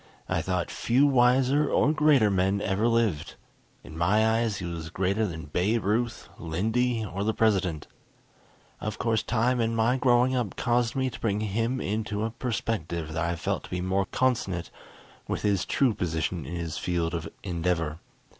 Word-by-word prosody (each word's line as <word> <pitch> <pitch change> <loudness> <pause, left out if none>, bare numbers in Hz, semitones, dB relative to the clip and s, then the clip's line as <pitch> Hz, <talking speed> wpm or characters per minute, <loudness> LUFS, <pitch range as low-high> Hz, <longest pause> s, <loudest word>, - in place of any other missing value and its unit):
I - - 0
thought 90 -2 -2
few 130 +5 +2
wiser 135 +2 +3
or 150 - +3
greater 145 -9 +4
men 95 +1 +1
ever 100 +3 0
lived. 115 -9 0 0.5
In 80 - -11
my 100 +7 +3
eyes 115 -4 -1
he 90 - -5
was 85 -2 -5
greater 95 +5 0
than 80 -2 -6
Babe 100 +9 0
Ruth, 115 +4 -1
Lindy, 110 +8 0
or 100 +1 -4
the 110 +1 0
President. 95 -8 +1 0.9
Of 110 0 -4
course, 110 -2 +1
time, 120 +2 +1
and 115 0 0
my 115 +3 +3
growing 125 0 +3
up 120 -6 -2
caused 120 0 +1
me 130 -1 0
to 115 - -9
bring 105 -2 0
him 115 +5 -1
into 105 0 -2
a 115 - -3
perspective 100 -9 -3
that 80 +1 -1
I 85 +1 -1
felt 80 - -3
to - - -13
be 90 - -3
more 95 +1 0
consonant 100 -9 -1 0.6
with - - -3
his 100 -2 +1
true 130 -5 +2
position 80 -4 -2
in 85 - -5
his 85 -2 -4
field 85 -1 -1
of 85 -1 -3
endeavor. 85 -3 -1
105 Hz, 175 wpm, -27 LUFS, 90-120 Hz, 0.9 s, greater